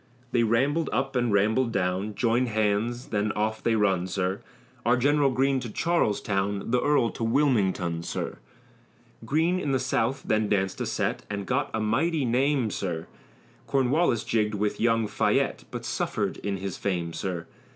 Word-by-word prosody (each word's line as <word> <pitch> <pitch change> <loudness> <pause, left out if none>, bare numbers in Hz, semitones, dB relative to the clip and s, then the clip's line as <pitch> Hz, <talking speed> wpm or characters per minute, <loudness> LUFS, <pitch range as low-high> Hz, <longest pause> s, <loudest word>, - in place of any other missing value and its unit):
They 120 - +3
rambled 135 +8 +2
up 135 +4 -1
and 120 -2 +1
rambled 110 +5 +2
down, 95 +1 -1
Joined 120 +3 +2
hands, 110 +3 0
then 105 -1 0
off 110 +1 -1
they 115 - +2
run, 95 -4 +2
sir. 95 0 -2 0.4
Our 120 +2 +3
General 145 +2 +3
Greene 135 +1 +2
to 125 -2 -6
Charlestown, 105 - 0
The 125 0 +3
earl 145 -6 +2
to - - -5
Wilmington, 105 - +1
sir. - - -4 0.9
Greene 165 +8 +1
in 145 -6 -1
the 130 - +2
South 130 +1 0
then 110 -1 +1
danced 95 -2 0
a - - -1
set, - - -1
And 100 -1 -3
got 135 +6 0
a 110 - -2
mighty 135 +8 +1
name, 130 -1 +1
sir, 85 -5 -3 0.6
Cornwallis 135 -2 +2
jigged 105 -2 0
with 105 0 -1
young 115 -1 +3
Fayette, - - 0
But - - -6
suffered - - -2
in 100 -1 -3
his 95 -1 -5
fame, 85 -4 -2
sir. 90 -3 -4
115 Hz, 160 wpm, -26 LUFS, 100-130 Hz, 0.9 s, They